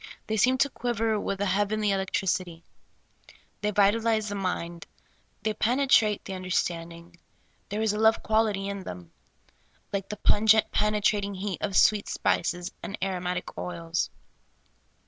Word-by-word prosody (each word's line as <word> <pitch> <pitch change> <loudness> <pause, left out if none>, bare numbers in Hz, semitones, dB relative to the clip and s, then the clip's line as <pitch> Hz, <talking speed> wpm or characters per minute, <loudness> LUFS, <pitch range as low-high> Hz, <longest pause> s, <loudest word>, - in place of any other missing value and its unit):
They 220 - -2
seem 255 +5 +3
to 280 +3 +3
quiver 225 -3 -1
with 195 -1 -3
a - - +2
heavenly 205 +2 +1
electric 195 0 -1
ity; 170 -2 -11 1.0
they 210 - 0
vitalize 215 +1 +2
the - - -4
mind; 175 -3 -3 0.6
they 215 - 0
penetrate 230 -2 +2
the 195 - -5
un 185 0 -6
derstanding; 170 -1 -3 0.5
there 210 +2 -2
is 215 -2 +2
a 210 - -3
love 220 +1 +4
quality 215 -3 +1
in 200 0 -4
them, 90 - -9 0.8
like 195 -1 -3
the 210 - -5
pungent, 220 +1 +4
penetrating 210 -1 +1
heat 195 0 -4
of 200 -2 0
sweet 210 -1 +4
spices 175 +1 0
and - - -6
aro 185 -1 -2
matic 180 0 -3
oils. 170 -1 -2
200 Hz, 145 wpm, -27 LUFS, 185-215 Hz, 1.0 s, love